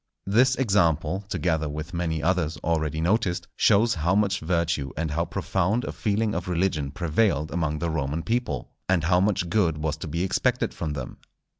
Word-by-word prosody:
This 125 Hz, +6 st, +4 dB
example, 95 Hz, -, +1 dB
together 80 Hz, -6 st, 0 dB
with 75 Hz, +4 st, -6 dB
many 80 Hz, -3 st, -2 dB
others 85 Hz, -3 st, +1 dB
already 80 Hz, -2 st, 0 dB
noticed, 90 Hz, 0 st, 0 dB
shows 115 Hz, +3 st, +4 dB
how 85 Hz, +3 st, +1 dB
much 100 Hz, -1 st, +2 dB
virtue 85 Hz, -4 st, -1 dB
and 80 Hz, -1 st, -1 dB
how 85 Hz, +3 st, 0 dB
profound 100 Hz, +8 st, 0 dB
a -, -, -3 dB
feeling 105 Hz, 0 st, 0 dB
of 85 Hz, +1 st, -3 dB
religion 85 Hz, -5 st, 0 dB
prevailed 80 Hz, 0 st, 0 dB
among 80 Hz, -3 st, -1 dB
the 85 Hz, +3 st, -2 dB
Roman 75 Hz, +1 st, -2 dB
people, 115 Hz, -, -2 dB, 0.2 s
and 90 Hz, -4 st, +3 dB
how 90 Hz, +2 st, +3 dB
much 95 Hz, -2 st, +1 dB
good 85 Hz, -4 st, +1 dB
was 75 Hz, 0 st, -2 dB
to 85 Hz, -, -6 dB
be 85 Hz, +4 st, -2 dB
expected 95 Hz, -, 0 dB
from 80 Hz, -3 st, -3 dB
them. 65 Hz, -4 st, -6 dB
85 Hz, 175 wpm, -25 LUFS, 80-95 Hz, 0.2 s, This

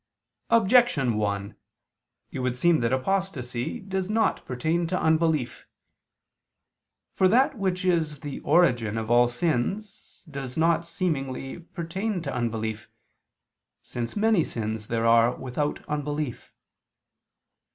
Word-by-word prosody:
Objection 230 Hz, -, +4 dB
1: 100 Hz, -1 st, -2 dB, 0.8 s
It -, -, -5 dB
would 125 Hz, -1 st, -1 dB
seem 170 Hz, +3 st, +4 dB
that 115 Hz, 0 st, 0 dB
apostasy 130 Hz, -5 st, -2 dB
does 190 Hz, -1 st, -3 dB
not 220 Hz, +1 st, +1 dB
pertain 160 Hz, +7 st, -1 dB
to 180 Hz, +2 st, -1 dB
unbelief. 160 Hz, -5 st, +1 dB, 1.5 s
For 190 Hz, -, +4 dB
that 260 Hz, +8 st, +3 dB
which 190 Hz, -3 st, -1 dB
is 160 Hz, -5 st, 0 dB
the 145 Hz, -2 st, -6 dB
origin 120 Hz, -10 st, +2 dB
of 110 Hz, +1 st, -3 dB
all 120 Hz, 0 st, +6 dB
sins, 175 Hz, -, -3 dB
does 135 Hz, -4 st, -7 dB
not, 165 Hz, +1 st, +2 dB
seemingly, 135 Hz, -6 st, -3 dB
pertain 180 Hz, +4 st, -4 dB
to 140 Hz, -4 st, -4 dB
unbelief, 110 Hz, -2 st, -3 dB, 0.9 s
since 120 Hz, -1 st, -5 dB
many 215 Hz, -4 st, +3 dB
sins 110 Hz, -3 st, -4 dB
there 115 Hz, 0 st, -1 dB
are 115 Hz, +1 st, +5 dB
without 135 Hz, +3 st, -3 dB
unbelief. 145 Hz, -2 st, -3 dB
150 Hz, 115 wpm, -26 LUFS, 120-180 Hz, 1.5 s, all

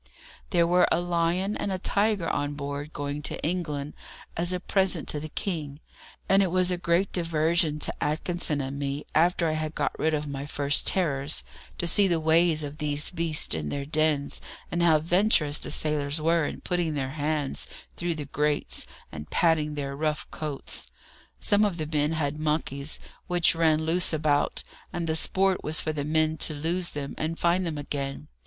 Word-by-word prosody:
There 170 Hz, -3 st, +3 dB
were 180 Hz, +1 st, +4 dB
a 165 Hz, -, +3 dB
lion 175 Hz, +3 st, 0 dB
and 200 Hz, -, -2 dB
a 190 Hz, -, -1 dB
tiger 200 Hz, -1 st, +1 dB
on 145 Hz, -1 st, -1 dB
board 145 Hz, +1 st, -5 dB
going 145 Hz, 0 st, -4 dB
to -, -, -2 dB
England 150 Hz, -4 st, -2 dB, 0.4 s
as 175 Hz, +2 st, +1 dB
a 180 Hz, -, 0 dB
present 190 Hz, -3 st, +1 dB
to 150 Hz, -, -2 dB
the 155 Hz, +1 st, -6 dB
King, 150 Hz, -7 st, -3 dB, 0.5 s
and 195 Hz, +1 st, +5 dB
it 190 Hz, -, +2 dB
was 185 Hz, +1 st, +2 dB
a 180 Hz, -, 0 dB
great 175 Hz, +3 st, +1 dB
diversion 165 Hz, -2 st, +1 dB
to -, -, -1 dB
Atkinson 155 Hz, 0 st, -1 dB
and 135 Hz, +1 st, -4 dB
me, 140 Hz, +1 st, -3 dB
after 170 Hz, +1 st, +3 dB
I -, -, +1 dB
had 155 Hz, 0 st, -3 dB
got -, -, 0 dB
rid 160 Hz, 0 st, +2 dB
of 150 Hz, 0 st, -2 dB
my 140 Hz, 0 st, -5 dB
first 145 Hz, 0 st, +1 dB
terrors, 150 Hz, -6 st, +1 dB, 0.3 s
to -, -, -1 dB
see 195 Hz, +4 st, +4 dB
the 170 Hz, -3 st, +2 dB
ways 160 Hz, 0 st, +3 dB
of 145 Hz, +2 st, -7 dB
these 150 Hz, 0 st, -1 dB
beasts 165 Hz, -3 st, +1 dB
in 75 Hz, -2 st, -2 dB
their 140 Hz, -1 st, -3 dB
dens, 150 Hz, -1 st, +1 dB, 0.3 s
and 170 Hz, -, 0 dB
how 165 Hz, -2 st, +6 dB
venturous 165 Hz, -2 st, +2 dB
the -, -, -7 dB
sailors 150 Hz, 0 st, 0 dB
were 165 Hz, -1 st, +2 dB
in -, -, -6 dB
putting 175 Hz, -3 st, -1 dB
their 135 Hz, -2 st, -2 dB
hands 150 Hz, -1 st, -1 dB, 0.3 s
through 170 Hz, -1 st, -2 dB
the 150 Hz, -2 st, -5 dB
grates, 150 Hz, +1 st, -1 dB, 0.2 s
and 75 Hz, -1 st, -8 dB
patting 155 Hz, -3 st, +2 dB
their 140 Hz, -1 st, -3 dB
rough 155 Hz, +1 st, -1 dB
coats. 150 Hz, -3 st, -4 dB, 0.5 s
Some 205 Hz, +1 st, +4 dB
of 200 Hz, -5 st, +1 dB
the 155 Hz, -, -2 dB
men 150 Hz, +1 st, +2 dB
had 150 Hz, -2 st, -1 dB
monkeys, 150 Hz, -2 st, -1 dB, 0.3 s
which 175 Hz, -2 st, +3 dB
ran 160 Hz, -1 st, +3 dB
loose 170 Hz, +1 st, +2 dB
about, 150 Hz, -2 st, +1 dB, 0.3 s
and 175 Hz, -1 st, -3 dB
the 160 Hz, -1 st, 0 dB
sport 190 Hz, +3 st, +3 dB
was 155 Hz, +1 st, +3 dB
for 155 Hz, -, -1 dB
the 145 Hz, -2 st, -2 dB
men 155 Hz, +1 st, +1 dB
to 155 Hz, 0 st, +1 dB
lose 170 Hz, +4 st, 0 dB
them, 140 Hz, -1 st, -5 dB
and 160 Hz, +2 st, -2 dB
find 175 Hz, +1 st, +2 dB
them 155 Hz, -2 st, -3 dB
again. 145 Hz, 0 st, -4 dB
155 Hz, 190 wpm, -27 LUFS, 145-170 Hz, 0.5 s, how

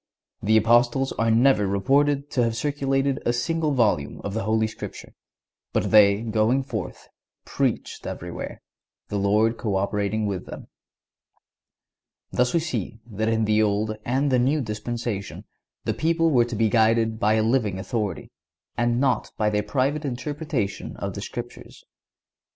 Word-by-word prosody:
The 110 Hz, +2 st, +4 dB
Apostles 120 Hz, +4 st, +3 dB
are 115 Hz, 0 st, +2 dB
never 115 Hz, -2 st, +4 dB
reported 140 Hz, +8 st, +1 dB
to 125 Hz, -, +2 dB
have 115 Hz, -1 st, 0 dB
circulated 135 Hz, +1 st, 0 dB
a -, -, +2 dB
single 155 Hz, +6 st, 0 dB
volume 105 Hz, -, +1 dB
of 100 Hz, -, -4 dB
the 110 Hz, -2 st, -2 dB
Holy 110 Hz, +1 st, +2 dB
Scripture, 110 Hz, -, -8 dB, 0.6 s
but -, -, 0 dB
"they 105 Hz, 0 st, +6 dB
going 115 Hz, +4 st, +1 dB
forth, 110 Hz, -8 st, -6 dB, 0.4 s
preached -, -, -2 dB
everywhere, -, -, -6 dB, 0.5 s
the 105 Hz, -, -1 dB
Lord 105 Hz, +3 st, +2 dB
co 105 Hz, -4 st, -1 dB
operating 105 Hz, +2 st, 0 dB
with 95 Hz, -3 st, -3 dB
them."(143) -, -, -9 dB, 1.6 s
Thus 125 Hz, 0 st, +1 dB
we 170 Hz, -, +2 dB
see 120 Hz, -, -4 dB
that 110 Hz, +2 st, -1 dB
in 110 Hz, -1 st, +1 dB
the 105 Hz, 0 st, +3 dB
Old 110 Hz, +1 st, 0 dB
and 135 Hz, +3 st, 0 dB
the 125 Hz, -, +4 dB
New 135 Hz, +5 st, +2 dB
Dispensation 110 Hz, -2 st, -4 dB, 0.4 s
the -, -, -1 dB
people 165 Hz, 0 st, +1 dB
were 120 Hz, -4 st, +4 dB
to 120 Hz, -1 st, -5 dB
be 110 Hz, +1 st, +2 dB
guided 110 Hz, 0 st, +2 dB
by 110 Hz, -1 st, +3 dB
a 110 Hz, -, +2 dB
living 110 Hz, -4 st, +1 dB
authority, 100 Hz, 0 st, -3 dB, 0.4 s
and 120 Hz, 0 st, +1 dB
not 130 Hz, -2 st, +1 dB
by 105 Hz, -1 st, +1 dB
their 105 Hz, 0 st, +1 dB
private 135 Hz, +8 st, -1 dB
interpretation 140 Hz, -, -3 dB
of -, -, -4 dB
the -, -, -6 dB
Scriptures. -, -, -8 dB
115 Hz, 150 wpm, -24 LUFS, 105-135 Hz, 1.6 s, they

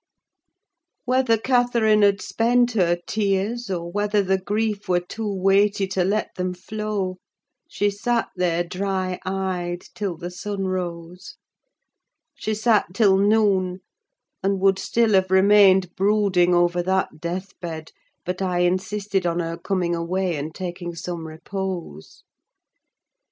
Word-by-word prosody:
Whether 255 Hz, -2 st, +2 dB
Catherine 235 Hz, -3 st, +2 dB
had 200 Hz, 0 st, +3 dB
spent 240 Hz, +1 st, +2 dB
her 175 Hz, -6 st, +2 dB
tears, 210 Hz, +3 st, -1 dB
or 170 Hz, -2 st, -3 dB
whether 205 Hz, +1 st, +1 dB
the 190 Hz, 0 st, +1 dB
grief 210 Hz, +1 st, -2 dB
were 180 Hz, -1 st, +3 dB
too 210 Hz, +4 st, -5 dB
weighty 195 Hz, +1 st, +2 dB
to 190 Hz, -1 st, 0 dB
let 205 Hz, +4 st, -1 dB
them 180 Hz, 0 st, -3 dB
flow, 200 Hz, -1 st, -4 dB, 0.5 s
she 205 Hz, 0 st, 0 dB
sat 230 Hz, +4 st, -1 dB
there 175 Hz, -2 st, +1 dB
dry 185 Hz, 0 st, -2 dB
eyed 185 Hz, -2 st, -3 dB
till 195 Hz, -5 st, -3 dB
the 175 Hz, +2 st, -6 dB
sun 195 Hz, +2 st, -4 dB
rose: 180 Hz, -1 st, -5 dB, 1.0 s
she 220 Hz, -6 st, -3 dB
sat 215 Hz, -4 st, +1 dB
till 200 Hz, -3 st, +5 dB
noon, 195 Hz, -3 st, +2 dB, 0.6 s
and 195 Hz, 0 st, 0 dB
would 195 Hz, 0 st, +3 dB
still 225 Hz, +1 st, +1 dB
have 190 Hz, -1 st, +3 dB
remained 190 Hz, -1 st, +5 dB
brooding 195 Hz, -3 st, +3 dB
over 175 Hz, 0 st, +2 dB
that 190 Hz, -2 st, -1 dB
deathbed, 170 Hz, -2 st, -6 dB, 0.3 s
but 180 Hz, +1 st, -3 dB
I 180 Hz, -2 st, 0 dB
insisted 190 Hz, +1 st, 0 dB
on 170 Hz, 0 st, -1 dB
her 165 Hz, -1 st, -2 dB
coming 180 Hz, -1 st, -1 dB
away 175 Hz, +1 st, -1 dB
and 150 Hz, +2 st, -4 dB
taking 175 Hz, -2 st, -5 dB
some 170 Hz, -1 st, -5 dB
repose. 170 Hz, -, -6 dB
190 Hz, 130 wpm, -23 LUFS, 180-205 Hz, 1.0 s, till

